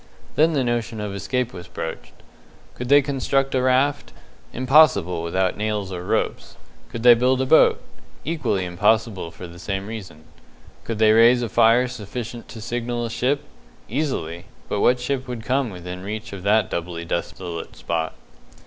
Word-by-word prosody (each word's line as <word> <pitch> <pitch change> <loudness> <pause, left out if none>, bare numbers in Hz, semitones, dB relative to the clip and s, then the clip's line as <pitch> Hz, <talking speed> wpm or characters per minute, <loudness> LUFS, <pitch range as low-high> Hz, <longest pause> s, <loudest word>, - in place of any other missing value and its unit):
Then 160 +2 +3
the 140 -3 +1
notion 120 -2 -2
of 105 -1 -4
escape 125 +5 -2
was 90 -2 -9
broached. 80 -2 -6 0.6
Could 125 0 -6
they 145 0 +6
construct 135 0 0
a 130 - +2
raft? 130 - +1 0.4
Impossible 125 - +4
without 95 +2 0
nails 105 -2 -2
or 90 -1 -5
ropes. - - -2 0.3
Could 115 - -6
they 120 -1 +9
build 125 +2 +2
a 130 - +1
boat? 160 - +5 0.5
Equally 145 - -1
impossible 105 +1 +1
for 90 - -10
the 85 0 -11
same 95 +1 -3
reason. 95 -8 -8 0.6
Could 115 - -3
they 110 0 +5
raise 120 +2 +6
a 115 - -2
fire 115 +3 +4
sufficient 120 0 -7
to 110 - -10
signal 120 +1 -3
a 115 - -5
ship? 140 +5 0 0.4
Easily; 105 - -3 0.2
but 105 - -2
what 125 0 +4
ship 130 +1 -2
would 120 -3 -5
come 130 0 0
within 90 -1 -7
reach 110 +3 -6
of 100 - -7
that 105 +1 +2
doubly 85 0 -4
desolate 85 0 -5
spot? 80 -1 -3
110 Hz, 165 wpm, -22 LUFS, 95-125 Hz, 0.6 s, they